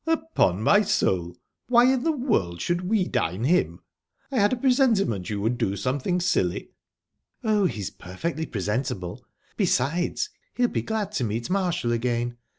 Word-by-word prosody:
"Upon 315 Hz, -, +1 dB
my 205 Hz, -, +5 dB
soul! 90 Hz, -, 0 dB, 0.3 s
Why 245 Hz, +1 st, +5 dB
in 260 Hz, -, 0 dB
the 325 Hz, -, +2 dB
world 220 Hz, -, 0 dB
should 175 Hz, +1 st, -1 dB
we 205 Hz, -4 st, +2 dB
dine 90 Hz, +7 st, -1 dB
him?...I 180 Hz, -, -2 dB
had 205 Hz, 0 st, +4 dB
a -, -, +2 dB
presentiment 235 Hz, -, +2 dB
you 105 Hz, -1 st, -2 dB
would 115 Hz, +3 st, 0 dB
do 100 Hz, -, 0 dB
something 140 Hz, -, -1 dB
silly." 135 Hz, -, 0 dB, 0.7 s
"Oh, 215 Hz, -3 st, +2 dB
he's 105 Hz, -, -4 dB
perfectly 160 Hz, -, -5 dB
presentable. 105 Hz, -3 st, -3 dB, 0.3 s
Besides, 175 Hz, -, 0 dB, 0.2 s
he'll 245 Hz, -1 st, +2 dB
be -, -, -1 dB
glad 215 Hz, -3 st, -2 dB
to 155 Hz, -11 st, -1 dB
meet 115 Hz, -, -3 dB
Marshall 180 Hz, -11 st, 0 dB
again. 120 Hz, 0 st, -1 dB
165 Hz, 150 wpm, -25 LUFS, -, 0.7 s, my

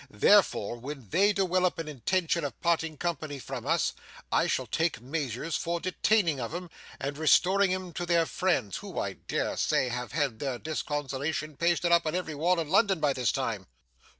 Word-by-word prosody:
Therefore 120 Hz, -, +3 dB
when 130 Hz, -2 st, -8 dB
they 200 Hz, -, +4 dB
dewelope 185 Hz, -2 st, +1 dB
an 165 Hz, -1 st, -4 dB
intention 165 Hz, -, 0 dB
of 145 Hz, -, -5 dB
parting 160 Hz, -2 st, 0 dB
company 155 Hz, -4 st, -3 dB
from 135 Hz, -1 st, -6 dB
us, 165 Hz, +1 st, +2 dB, 0.4 s
I -, -, +3 dB
shall -, -, 0 dB
take 160 Hz, -6 st, 0 dB
measures 135 Hz, +3 st, -3 dB
for 170 Hz, 0 st, -1 dB
detaining 185 Hz, -3 st, +1 dB
of 120 Hz, +6 st, -4 dB
'em, 175 Hz, -1 st, -6 dB, 0.3 s
and 140 Hz, +2 st, -4 dB
restoring 185 Hz, +5 st, +4 dB
'em 185 Hz, -2 st, -3 dB
to 175 Hz, +2 st, -4 dB
their 170 Hz, -1 st, +3 dB
friends, 150 Hz, -, 0 dB
who -, -, -9 dB
I -, -, -1 dB
dare -, -, -3 dB
say 130 Hz, -, +1 dB
have 125 Hz, +2 st, -4 dB
had 140 Hz, -7 st, 0 dB
their 135 Hz, -4 st, -2 dB
disconsolation 145 Hz, +1 st, -3 dB
pasted 170 Hz, +1 st, +1 dB
up 170 Hz, -1 st, +4 dB
on 155 Hz, -, -1 dB
every 180 Hz, -3 st, -2 dB
wall 170 Hz, +4 st, +1 dB
in 160 Hz, -, -2 dB
London 195 Hz, -1 st, +3 dB
by 145 Hz, -2 st, +2 dB
this 125 Hz, -5 st, +1 dB
time. -, -, -3 dB
160 Hz, 180 wpm, -29 LUFS, 140-175 Hz, 0.4 s, they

